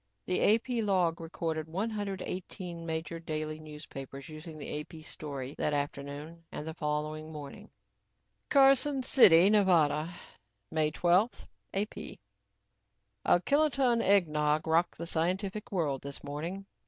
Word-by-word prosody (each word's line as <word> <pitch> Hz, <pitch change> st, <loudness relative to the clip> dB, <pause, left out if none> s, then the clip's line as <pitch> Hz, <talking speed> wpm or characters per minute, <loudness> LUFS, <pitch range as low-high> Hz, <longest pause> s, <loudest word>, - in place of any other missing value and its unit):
The 190 Hz, +3 st, +4 dB
AP 235 Hz, +1 st, -2 dB
log 180 Hz, -5 st, +1 dB
recorded 160 Hz, -1 st, -3 dB
one 195 Hz, +8 st, -2 dB
hundred 200 Hz, -3 st, -3 dB
eighteen 175 Hz, -2 st, -6 dB
major 160 Hz, +1 st, -3 dB
daily 155 Hz, -1 st, -4 dB, 0.3 s
papers 135 Hz, +1 st, -8 dB
using 155 Hz, +1 st, -9 dB
the 150 Hz, 0 st, -4 dB
AP 155 Hz, +1 st, -9 dB
story 140 Hz, -4 st, -6 dB
that 150 Hz, -, +1 dB
afternoon 145 Hz, +3 st, -5 dB
and 150 Hz, -, -6 dB
the 160 Hz, -, -4 dB
following 155 Hz, 0 st, -3 dB
morning: 150 Hz, +8 st, -9 dB, 0.8 s
CARSON 275 Hz, 0 st, +5 dB
CITY, 195 Hz, -8 st, +7 dB
NEV., 170 Hz, -7 st, +3 dB, 0.6 s
May 155 Hz, -1 st, +2 dB
12 180 Hz, +8 st, +2 dB, 0.3 s
(AP) 205 Hz, +2 st, -2 dB
A 100 Hz, +3 st, -5 dB
kiloton 275 Hz, -3 st, +3 dB
eggnog 155 Hz, -6 st, +3 dB
rocked 165 Hz, +2 st, +2 dB
the 170 Hz, -, -5 dB
scientific 185 Hz, +5 st, -2 dB
world 150 Hz, -8 st, 0 dB
this 140 Hz, 0 st, -7 dB
morning. 165 Hz, +7 st, -5 dB
165 Hz, 125 wpm, -31 LUFS, 150-195 Hz, 0.8 s, CITY